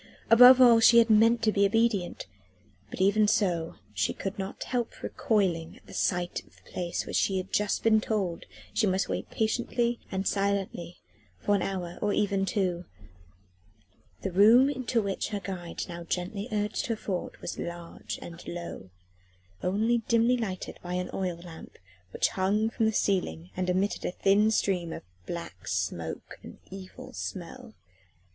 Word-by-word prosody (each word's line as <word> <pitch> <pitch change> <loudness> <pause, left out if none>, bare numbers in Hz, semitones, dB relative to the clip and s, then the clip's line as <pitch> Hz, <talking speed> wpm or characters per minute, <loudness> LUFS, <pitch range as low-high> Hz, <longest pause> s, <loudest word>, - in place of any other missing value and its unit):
Above 250 +3 +9
all 240 -3 +8
she 235 +1 +7
had 230 -1 +6
meant 230 +2 +5
to 220 - +4
be 200 -1 +2
obedient. 210 -3 +1 0.6
But 185 - -5
even 210 +2 +4
so, 175 -6 +1 0.2
she 95 -2 0
could 195 0 -5
not 195 0 -5
help 245 -2 -3
recoiling 180 -7 0
at - - -10
sight 180 -1 -1
of - - -25
the - - -21
place 175 -1 -3
where - - -7
she 195 - +2
had 185 0 -5
just 210 -1 0
been 220 -1 +4
told 195 -7 -2 0.3
she 220 - +2
must 190 0 +1
wait - - -3
patiently 235 +1 0
and 190 0 -2
silently 195 -4 -1 0.4
for 205 - 0
an 200 - +2
hour, 180 -3 -4
or 205 -1 +1
even 195 -2 +1
two. 180 -3 -1 1.4
The 195 - -2
room 225 +9 +6
into 250 -4 -1
which 195 -1 -2
her 210 -1 -3
guide 180 -3 -5
now 170 -1 -7
gently 185 +5 -3
urged 210 0 -1
her 230 - 0
forward 190 -4 -4
was - - -6
large 170 -1 -6
and 170 0 -9
low, 170 - -7 0.7
only 220 +6 +1
dimly 235 +2 +4
lighted 200 -7 -4
by 180 0 -4
an 180 0 -3
oil 180 -3 -2
lamp 170 -1 -12 0.3
which - - +1
hung 210 +4 0
from 225 -1 +1
the - - +2
ceiling 95 - -1
and 185 0 -1
emitted 190 +3 0
a - - -1
thin 200 +4 +3
stream 180 -6 0
of - - -8 0.2
black 170 - -7
smoke 85 -3 -3
and - - -11
evil 190 -1 -10
smell. 220 +6 -7
195 Hz, 165 wpm, -28 LUFS, 175-220 Hz, 1.4 s, Above